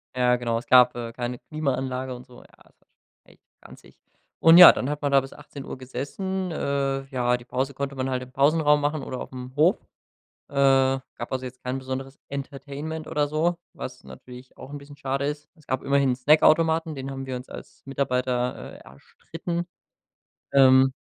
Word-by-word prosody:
Ja 125 Hz, -1 st, +3 dB
genau, 115 Hz, -2 st, -1 dB
es 120 Hz, -, -6 dB
gab, 125 Hz, -1 st, +6 dB
äh, 115 Hz, -1 st, -6 dB
keine 120 Hz, 0 st, -4 dB
Klimaanlage 130 Hz, -4 st, -3 dB
und 125 Hz, -, -12 dB
so, 125 Hz, -2 st, -16 dB
ja, -, -, -19 dB, 0.2 s
das -, -, -28 dB
war -, -, -35 dB
schon -, -, -55 dB
echt -, -, -25 dB, 0.2 s
ranzig. -, -, -17 dB, 0.4 s
Und 165 Hz, +1 st, +8 dB
ja, 180 Hz, -, +12 dB
dann 130 Hz, -, -3 dB
hat 150 Hz, 0 st, -4 dB
man 145 Hz, -, -1 dB
da 135 Hz, -1 st, +5 dB
bis 135 Hz, -, -10 dB
18:00 145 Hz, -2 st, -9 dB
gesessen, 170 Hz, +9 st, -4 dB
äh, 140 Hz, -2 st, -1 dB
ja, 125 Hz, -1 st, +1 dB
die 120 Hz, -, -15 dB
Pause 130 Hz, +2 st, -2 dB
konnte 140 Hz, 0 st, -4 dB
man 130 Hz, 0 st, -2 dB
halt 125 Hz, -1 st, -2 dB
im 130 Hz, -, -14 dB
Pausenraum 150 Hz, +1 st, +3 dB
machen 145 Hz, -1 st, -1 dB
oder 130 Hz, -, -6 dB
auf -, -, -8 dB
'm 125 Hz, 0 st, -8 dB
Hof, 155 Hz, +5 st, +4 dB, 0.7 s
äh, -, -, -17 dB, 0.6 s
gab 120 Hz, -, -7 dB
also 130 Hz, 0 st, -3 dB
jetzt 130 Hz, 0 st, -10 dB
kein 130 Hz, +1 st, -3 dB
besonderes 130 Hz, +1 st, -6 dB
Entertainment 140 Hz, +3 st, -6 dB
oder 145 Hz, -1 st, 0 dB
so, 165 Hz, +4 st, 0 dB, 0.2 s
was -, -, -8 dB
natürlich 125 Hz, -, -13 dB
auch -, -, -11 dB
'n 145 Hz, -, -6 dB
bisschen 145 Hz, 0 st, -13 dB
schade 135 Hz, 0 st, -2 dB
ist. 145 Hz, +1 st, -5 dB
Es 155 Hz, -3 st, -23 dB
gab 130 Hz, 0 st, -2 dB
immerhin 140 Hz, -1 st, +2 dB
'n 125 Hz, -, 0 dB
Snackautomaten, 160 Hz, +3 st, +3 dB
den 135 Hz, -1 st, -6 dB
haben 135 Hz, 0 st, -6 dB
wir 130 Hz, -1 st, -4 dB
uns 125 Hz, +1 st, -8 dB
als -, -, -11 dB
Mitarbeiter, 125 Hz, -2 st, -2 dB
äh, -, -, -12 dB
erstritten, 170 Hz, -, -7 dB, 0.9 s
ähm. 130 Hz, -1 st, +6 dB
135 Hz, 195 wpm, -25 LUFS, 125-145 Hz, 0.9 s, ja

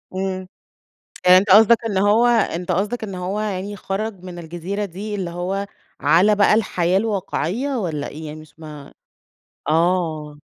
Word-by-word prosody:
إمم، 185 Hz, -1 st, -3 dB, 0.8 s
يعني 180 Hz, 0 st, +9 dB
أنتَ 200 Hz, +2 st, -1 dB
قصدك 225 Hz, +4 st, +6 dB
إن 205 Hz, -4 st, -1 dB
هو 210 Hz, +4 st, +4 dB
أنتَ 185 Hz, -7 st, +1 dB
قصدك 210 Hz, +6 st, -1 dB
إن 195 Hz, -3 st, -6 dB
هو 185 Hz, +3 st, -3 dB
يعني 205 Hz, -1 st, -4 dB
خرج 195 Hz, 0 st, -4 dB
من 180 Hz, -1 st, -8 dB
الجزيرة 175 Hz, +5 st, -4 dB
دي 200 Hz, +3 st, -6 dB
اللي 190 Hz, -4 st, -3 dB
هو 185 Hz, +3 st, -3 dB, 0.3 s
على 195 Hz, +6 st, +4 dB
بقى 205 Hz, +1 st, +4 dB
الحياة 185 Hz, -4 st, +1 dB
الواقعيّة، 215 Hz, -, -2 dB
والّا 160 Hz, -8 st, -3 dB
إيه 155 Hz, +2 st, -8 dB
يعني؟ 155 Hz, +1 st, -8 dB
مش 155 Hz, +1 st, -18 dB
ما 150 Hz, -3 st, -11 dB, 0.7 s
آه. 160 Hz, -2 st, 0 dB
185 Hz, 155 wpm, -21 LUFS, 170-205 Hz, 0.8 s, يعني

